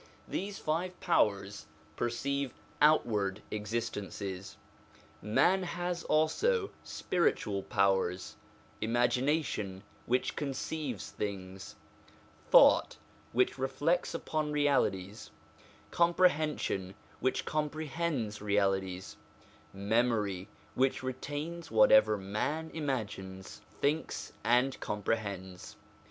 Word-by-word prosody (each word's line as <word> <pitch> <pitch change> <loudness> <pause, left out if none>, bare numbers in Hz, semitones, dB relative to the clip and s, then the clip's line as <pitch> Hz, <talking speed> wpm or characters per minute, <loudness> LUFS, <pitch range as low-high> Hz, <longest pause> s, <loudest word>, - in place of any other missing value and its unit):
These 195 +1 -3
five 175 +4 -2
powers 100 - +1 0.3
perceive 135 +3 -2 0.3
outward 110 -10 +3
existences. 105 -3 -4 0.6
Man 175 - +3
has 175 -1 -3
also 400 - +2
spiritual 105 - 0
powers: 95 -2 +1 0.5
imagination, 120 -3 0 0.2
which 125 +1 +1
conceives 135 - -4
things; 95 -2 -5 0.7
thought, - - +6 0.3
which 125 +2 +2
reflects 150 +6 0
upon 155 -1 -2
realities; 115 -9 0 0.6
comprehension, 155 - +2 0.2
which 130 +1 0
comprehends 150 -7 -2
realities; 95 -3 0 0.5
memory, 105 -2 0 0.3
which 130 0 +1
retains 145 +6 -5
whatever 265 - +6
man 110 +12 -2
imagines, 100 -10 -4 0.2
thinks, 150 +3 -1
and 125 +4 +2
comprehends. 100 -3 -3
120 Hz, 75 wpm, -32 LUFS, 100-155 Hz, 0.7 s, thought